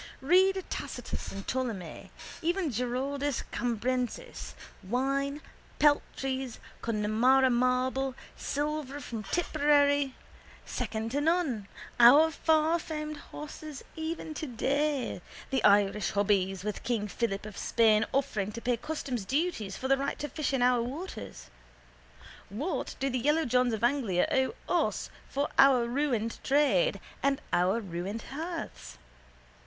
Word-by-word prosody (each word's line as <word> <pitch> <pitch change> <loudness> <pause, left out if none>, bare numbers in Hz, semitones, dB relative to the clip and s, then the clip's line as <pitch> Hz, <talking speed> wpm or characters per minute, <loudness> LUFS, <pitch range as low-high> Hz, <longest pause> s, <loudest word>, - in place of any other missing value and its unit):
Read 375 +6 +4
Tacitus - - -5
and 195 0 -7
Ptolemy, 225 -11 -3 0.3
even 345 -1 0
Giraldus 260 +3 -1
Cambrensis. 245 - -2 0.3
Wine, 275 +7 -1 0.4
peltries, 270 -3 +1 0.2
Connemara 230 +4 +3
marble, 255 +2 +1 0.2
silver 290 -1 -3
from 235 -5 -5
Tipperary, 285 - +2 0.5
second 225 -1 -3
to 285 +3 0
none, 300 - +1 0.3
our 285 +7 +8
farfamed 315 -1 0
horses 300 0 -9
even 320 0 -4
today, 285 0 -1 0.3
the 265 - +1
Irish 205 0 +4
hobbies, 195 -2 +1
with 210 -1 -3
king 230 -3 -1
Philip 205 -2 -2
of 215 -1 -8
Spain 220 -1 +3
offering 220 -7 0
to 230 - -5
pay 245 0 +1
customs 275 -5 -4
duties 255 - -1
for 265 - -3
the 270 0 +4
right 275 +1 -2
to 295 - -3
fish 300 +1 -2
in 265 -3 +1
our 250 -1 +4
waters. 260 - -7 1.0
What 260 - -3
do 270 - 0
the 255 -2 -1
yellowjohns 255 -4 +2
of 220 0 -3
Anglia 240 -8 +2
owe 265 - +1 0.3
us - - -5 0.2
for 280 +1 -1
our 265 -3 +7
ruined 240 -4 -1
trade 295 - +3 0.2
and 275 0 +2
our 185 +5 +3
ruined 195 +2 -5
hearths? 320 - -6
260 Hz, 120 wpm, -30 LUFS, 225-295 Hz, 1.0 s, our